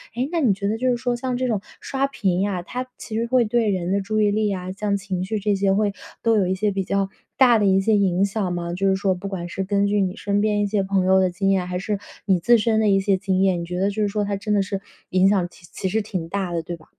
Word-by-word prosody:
诶， 250 +3 -1
那 340 - 0
你 250 -10 +3
觉 200 +1 -3
得 210 - 0
就 255 +2 0
是 245 - +2
说 245 0 -1
像 250 +1 -2
这 255 0 -1
种 215 -5 0 0.2
刷 275 0 -1
屏 190 -9 0
呀， 195 -3 -1
它 250 +7 -5
其 220 - -7
实 230 +1 0
会 250 -1 +3
对 225 0 +1
人 185 -2 -1
的 200 +1 +1
注 215 +2 -1
意 205 -1 +3
力 215 +1 +1
呀， 185 -2 -3
像 200 +1 -1
情 190 -2 -3
绪 190 +4 -3
这 205 +1 +1
些 195 0 +2
会 205 0 +1 0.3
都 230 -1 +3
有 195 -3 +2
一 185 - 0
些 205 +2 0
比 195 0 -1
较 195 0 0 0.3
大 245 -3 +6
的 205 - +2
一 190 0 +4
些 220 +2 +3
影 190 -2 +2
响 200 -3 -2
吗？ 170 -1 -3
就 195 +2 0
是 190 - +3
说 190 0 +1
不 185 +2 -6
管 180 -3 -5
是 190 - -3
根 200 +1 +1
据 205 +1 +1
你 185 0 -1
身 200 0 -1
边 210 0 +1
一 - - +2
些 205 0 0
朋 190 -1 +1
友 190 0 +5
的 185 -1 +3
经 195 +2 -1
验， 190 -2 +1
还 180 0 -3
是 205 +1 -2 0.3
你 190 -2 +3
自 235 +8 +5
身 220 0 +1
的 220 - +2
一 195 -1 +4
些 195 -1 +2
经 190 0 0
验， 190 -2 +2
你 170 - -4
觉 180 +1 -5
得 195 +2 +2
就 200 - -6
是 - - +2
说 205 +1 -1
它 200 0 -1
真 210 +2 -2
的 205 - +3
是 195 0 -3 0.3
影 185 +1 +4
响 195 -3 +3
其 175 - -18
其 190 - -3
实 220 +4 0
挺 185 -6 -5
大 190 -2 -2
的， 170 - -1
对 175 +1 -5
吧？ 160 - -20
200 Hz, 325 characters per minute, -22 LUFS, 190-215 Hz, 0.3 s, 大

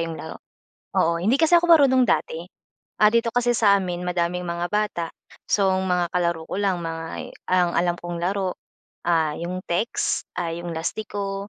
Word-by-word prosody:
'yong 165 -1 -3
laro. - - -8 0.6
Oo, 170 +1 +2
hindi 215 +9 +3
kasi 320 +1 +3
ako 345 - +3
marunong 265 -5 +6
dati. 165 +1 0 0.6
Ah, 210 - +7
dito 235 0 +2
kasi 245 0 +2
sa 205 -3 +5
amin 180 -2 -4
madaming 180 0 -1
mga 170 0 -2
bata. 210 -5 0 0.4
So, 195 -2 +3
mga 180 -2 0
kalaro 170 -2 0
ko - - -4
lang 190 -3 0
mga 165 -1 -5 0.2
ang 180 -1 +3
alam 175 0 +2
kong 175 0 -5
laro, 190 0 -1 0.5
ah, 160 -3 +2
'yong 180 +2 -4
text, 175 +7 0
ah, 175 -1 -1
'yong 170 0 -5
lastiko, 200 +3 -4
180 Hz, 165 wpm, -23 LUFS, 170-205 Hz, 0.6 s, Ah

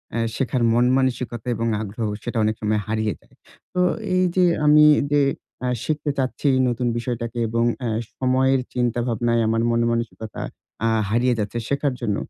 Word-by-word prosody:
আ - - 0 0.2
শেখার 130 -2 -1
মন 120 +1 +3
মানসিকতা 125 -3 -2
এবং 115 0 -2
আগ্রহ 110 +2 -4 0.2
সেটা 120 -1 -3
অনেক 110 0 +1
সময় 105 0 +1
হারিয়ে 110 -1 -1
যায়। - - -26 0.4
তো 180 - -2 0.4
এইযে 185 0 +3 0.2
আমি 150 +1 +7 0.3
যে, 145 - +4 0.4
অ্যা 125 - -1 0.2
শিখতে 150 -1 -1
চাচ্ছি 135 +2 -1 0.2
নতুন 120 0 -1
বিষয়টাকে, 120 0 -4
এবং 115 +1 0 0.2
অ্যা 120 - -2 0.3
সময়ের 130 +1 +2
চিন্তা 120 -1 0
ভাবনায় 115 0 +1
আমার 115 +1 +1
মনমানসিকতা 115 -1 -1 0.4
অ্যা 115 - +2 0.2
হারিয়ে 120 +3 +2
যাচ্ছে 105 +2 -3
শেখার 140 -1 0
জন্য। 105 - 0
120 Hz, 155 wpm, -22 LUFS, 115-130 Hz, 0.4 s, আমি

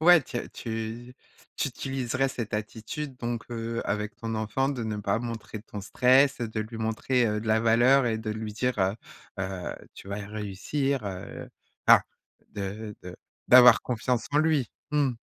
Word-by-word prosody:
ouais 175 0 +8
tu 120 - -7
as - - -3
tu 115 +2 -5 0.4
tu - - 0
utiliserais 135 0 -1
cette 120 -4 -5
attitude 110 +7 -4
donc 120 -1 -3
heu, 115 0 -3
avec 105 0 -2
ton 115 0 -4
enfant, 110 +5 0
de 135 -4 -2
ne 110 -1 -2
pas 100 +1 0
montrer 115 -2 -6
ton 105 -2 -7
stress, 130 +6 +4
de 110 -1 -2
lui 110 +2 -6
montrer, 115 +3 +1
heu, 105 -1 0
de 110 - -8
la 110 0 +4
valeur 120 +4 +5
et 110 -1 0
de 110 -1 -4
lui 110 0 -4
dire 125 +1 -1
heu, 95 +1 +2 0.5
heu: 95 -1 -4 0.2
«Tu 100 - -12
vas 100 - -3
réussir», 110 +6 -2
heu, 95 -1 -7 0.4
enfin - - +8 0.5
de 105 +2 -5
de 90 0 -9 0.3
d'avoir 125 0 +9
confiance 125 0 -1
en 145 - +4
lui. 155 -6 +2 0.2
Mmh. 145 -4 +2
115 Hz, 175 wpm, -27 LUFS, 105-125 Hz, 0.5 s, d'avoir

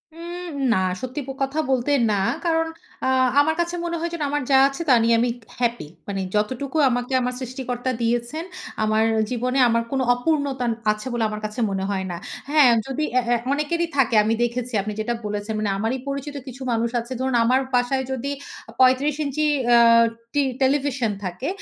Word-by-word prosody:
উম 345 +1 -7 0.2
না - - +2 0.2
সত্যি 255 +3 -4
প - - -7
কথা 270 +3 0
বলতে 260 +1 +1 0.2
না। 205 - +1 0.3
কারণ 325 -1 +2 0.4
আ - - +1 0.3
আমার 315 +2 +1
কাছে 345 0 0
মনে 340 0 -2
হয় 340 +1 -2
যেন 340 - -4
আমার 290 +1 -1
যা 265 - +7
আছে, 275 +4 -5
তা - - +7
নিয়ে 230 0 +4
আমি 240 +1 +2 0.3
হ্যাপি। 240 -8 -1 0.2
মানে 195 -1 -3
যতটুকু 255 +8 -1
আমাকে 245 +1 -2
আমার 250 0 -1
সৃষ্টিকর্তা 255 -1 -3
দিয়েছেন, 240 +7 -1 0.4
আমার 215 0 +2 0.2
আ - - +3
জীবনে 250 +2 0
আমার 230 0 +2
কোনো 270 -1 +1
অপূর্ণতা 275 0 -1
আন 230 - +1 0.2
আছে 215 +3 -5
বলে 240 -1 0
আমার 215 0 -5
কাছে 215 +3 -5
মনে 190 -1 -2
হয় 190 -2 -2
না। 175 - -4 0.3
হ্যাঁ 295 -3 +6 0.2
যদি 270 +3 -2
অ্যা 255 - +4
অ্যা 240 0 +3 0.2
অনেকেরই 335 +4 0
থাকে 250 -4 +3
আমি 220 +2 +1
দেখেছি 240 +1 -2
আপনি 210 +2 -4
যেটা 225 +2 -1
বলেছেন 210 +1 -3
মানে 210 - 0
আমারই 225 +5 -1
পরিচিত 280 +1 -4
কিছু 260 +1 -9
মানুষ 230 0 +1
আছে। 235 +2 -8
ধরুন 260 -1 0
আমার 255 +2 +4 0.2
বাসায় 250 +2 +1
যদি 265 +2 -3 0.4
আ - - -9
৩৫ 260 +3 +4
ইঞ্চি 305 +2 -1 0.3
আ - - +7 0.6
টি 290 -1 +3 0.2
টেলিভিশন 265 -3 +1
থাকে, 185 +8 -4
255 Hz, 190 wpm, -23 LUFS, 230-285 Hz, 0.6 s, যা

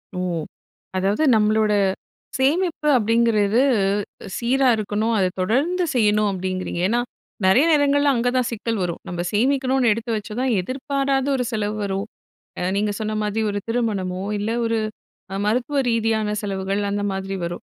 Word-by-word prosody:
ஓ! - - -3 0.8
அதாவது 195 +9 +1
நம்மளோட, 215 0 +3 0.7
சேமிப்பு 310 +4 +1
அப்படிங்குறது 225 -1 +2 0.8
சீராக 250 0 +3
இருக்கணும், 215 +2 -1
அத 190 -2 +3
தொடர்ந்து 290 - +1
செய்யணும் 210 -2 +3
அப்படிங்குறீங்க. 185 -2 -3
ஏன்னா, 235 +4 +1 0.5
நிறைய 190 +9 +5
நேரங்கள்ல 285 -1 +3
அங்க 240 +1 +1
தான் 250 -2 +1
சிக்கல் 230 0 -2
வரும். 170 -2 -3
நம்ப 175 -1 -3
சேமிக்கணும்னு 260 +2 +2
எடுத்து 230 +2 -5
வச்சா 210 0 -7
தான், 260 -1 +1
எதிர்பாராத 270 - -1
ஒரு 255 - 0
செலவு 215 -1 -2
வரும். 195 0 -2 0.5
அ - - -3
நீங்க 205 +1 0
சொன்ன 215 0 -2
மாதிரி 210 +1 -1
ஒரு 205 - -2
திருமணமோ 200 -6 -1 0.2
இல்ல, 205 +2 -2 0.2
ஒரு 230 0 0 0.6
அ - - -2
மருத்துவ 250 +6 0
ரீதியான 220 -2 0
செலவுகள் 195 0 -2
அந்த 205 0 -1
மாதிரி 195 0 -4
வரும். 170 +1 -5
220 Hz, 140 wpm, -22 LUFS, 205-255 Hz, 0.8 s, நிறைய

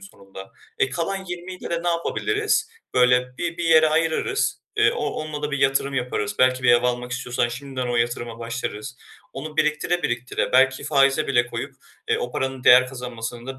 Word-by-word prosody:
sonunda. 95 - -13 0.3
E, 130 - +2
kalan 190 +8 -3
20'yle 180 +1 -7
de 170 0 -1
ne 175 - 0
yapabiliriz? 420 - 0 0.2
Böyle, 125 0 +3
bi 170 -1 -3
bir 170 - -2
yere 160 -1 +6
ayırırız, 160 +1 0 0.2
ııı, - - +4
o - - -2
onunla 155 -1 -5
da 150 - -2
bir 140 - -2
yatırım 135 0 +1
yaparız. 115 -5 -2
Belki 130 0 +3
bir 125 - +5
ev 120 0 +5
almak 125 0 -1
istiyorsan 125 -1 -1
şimdiden 130 +1 -5
o 120 - 0
yatırıma 120 -1 -2
başlarız. 115 0 -5 0.4
Onu 155 +3 -7
biriktire 155 +4 +1
biriktire 120 +1 -2
belki 130 +1 +3
faize 135 -2 +3
bile 120 -3 +2
koyup, - - -6 0.3
eee, - - +2
o 125 - -4
paranın 130 -1 -3
değer 130 +1 +7
kazanmasını 120 -2 -7
da 135 0 -6
130 Hz, 180 wpm, -23 LUFS, 120-155 Hz, 0.4 s, değer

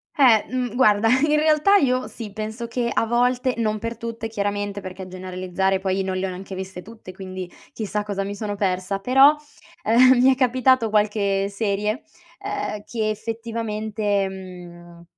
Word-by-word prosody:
Eh, 240 -7 +5
mhmm, 250 -2 -3
guarda, 215 -4 +4
in 295 +4 +3
realtà 310 +6 +4
io 255 -6 +1
sì, 220 -3 -8
penso 220 +3 -5
che 235 0 -2
a - - +2
volte, 245 +2 +1
non 215 -2 0
per 230 +1 -5
tutte 230 -1 -5
chiaramente, 205 -1 -3
perché 185 -1 -8
a - - -9
generalizzare 185 +1 -2
poi 190 0 -1
non 190 0 -2
le 190 +1 -1
ho - - -4
neanche 185 +1 -8
viste 190 -1 -7
tutte, 220 -3 -11
quindi 185 -1 -7 0.2
chissà 210 -1 -3
cosa 200 -1 -3
mi 200 +1 -5
sono 205 0 -4
persa, 195 0 -1
però, 270 +7 +6 0.5
ehm, 250 +3 +5
mi 265 - +6
è 260 - +2
capitato 255 -2 +3
qualche 200 -2 +1
serie, 210 +4 -2 0.4
uhm, 405 - -4
che 220 -2 -2
effettivamente, 215 -2 -2
mhmm, 175 -2 -11
215 Hz, 165 wpm, -23 LUFS, 195-240 Hz, 0.5 s, però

